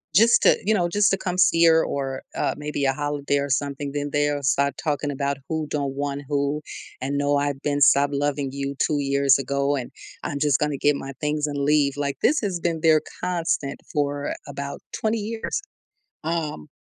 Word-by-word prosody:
just 230 +3 +6
to - - +6
you 215 +3 +2
know, 175 -4 +2
just 205 +3 +3
to 195 - +2
come 180 -1 -3
see 170 -1 +5
her 160 -1 +6
or, 135 -1 -3
uh, - - 0
maybe 150 -1 -2
a 135 - +3
holiday 145 0 -1
or 140 0 -2
something, 140 +1 -1
then 145 0 -2
they'll 145 0 0
start 140 0 +2
talking 145 -2 -1
about 140 0 -1
who 160 -1 -1
don't 140 -2 -2
want 140 0 -2
who 145 +1 0 0.4
and, 140 +2 -1
"No, 145 0 +2
I've 140 -1 -1
been 145 -1 0
stopped 140 +1 +5
loving 145 -1 -1
you 140 0 -4
2 150 -1 0
years 140 0 +3
ago 140 +1 0
and 130 -3 -5 0.3
I'm 145 - -3
just 145 -3 +3
gonna 150 -2 0
get 145 +1 +3
my 135 0 -6
things 150 0 0
and 145 -1 -4
leave," 140 0 +2
like, 140 -1 -2
this 300 - +3
has 190 -5 -2
been 165 -2 -1
their 160 -2 +5 0.2
constant 165 -5 -1
for 145 -1 -1
about 140 0 -6
20 220 +1 0
years, 225 - -3 0.6
um, 155 - -3
145 Hz, 195 wpm, -24 LUFS, 140-155 Hz, 0.6 s, just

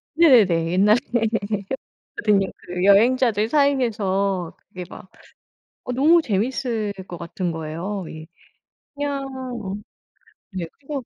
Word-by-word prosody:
네네네. 200 - +5
옛날에 210 +4 +5 0.2
해 235 - +3 1.0
봤거든요. 200 -3 +2 0.2
그 180 0 -4
여행자들 220 +2 +4
사이에서 205 - +1 0.2
그게 180 -1 -7
막 190 - -12 0.8
어 - - -5
너무 315 +7 +5
재밌을 225 -1 -1 0.2
것 175 - -7
같은 175 +1 -3
거예요, 165 +5 -4
예. 155 0 -9 0.7
그냥 285 -1 -2 0.4
어 190 0 -4 0.8
네. 185 -3 -4
그리고 280 -2 -6
205 Hz, 235 characters per minute, -22 LUFS, 185-255 Hz, 1.0 s, 네네네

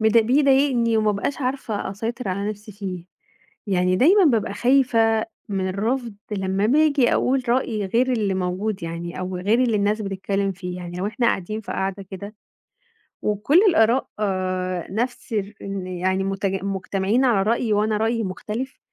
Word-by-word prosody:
بيض 220 +1 +3
بيضايقني 260 -1 +3
وما 215 -1 +2
بقاش 205 +9 -3
عارفة 250 -7 -2
أسيطر 225 +3 -4
على 200 +2 -2
نفسي 210 0 -9
فيه. 190 -3 -6 0.6
يعني 180 -2 +2
دايمًا 365 - +5
بابقى 230 - +2
خايفة 230 -3 +3 0.2
مِن 190 -2 -1
الرفض 225 +4 -2 0.2
لمّا 190 0 0
باجي 285 0 +3
أقول 260 +1 +1
رأي 235 -4 0
غير 245 +6 +2
اللي 210 -5 0
موجود 185 +2 -2
يعني 170 +1 -5
أو 185 0 -3
غير 210 +7 +2
اللي 235 -4 +2
الناس 210 +1 +1
بتتكلم 195 0 -2
فيه. 180 -1 -6
يعني 175 -1 -7
لو 190 - -1
إحنا 230 +3 0
قاعدين 215 +1 -1
في - - -6
قعدة 195 +1 -2
كده، 200 +2 -8 0.9
وكُل 210 - +2
الآراء 250 -5 +3 0.9
نفس 240 +2 -3
ال 205 -1 -3
إن 195 -2 -4
يعني 185 +1 -1
متج 195 0 -2
مُجتمعين 195 +5 0
على 220 -6 +3
رأي 225 +1 +1
وأنا 210 +1 +1
رأيي 225 +1 0
مُختلف، 215 +7 -5
210 Hz, 155 wpm, -23 LUFS, 195-235 Hz, 0.9 s, دايمًا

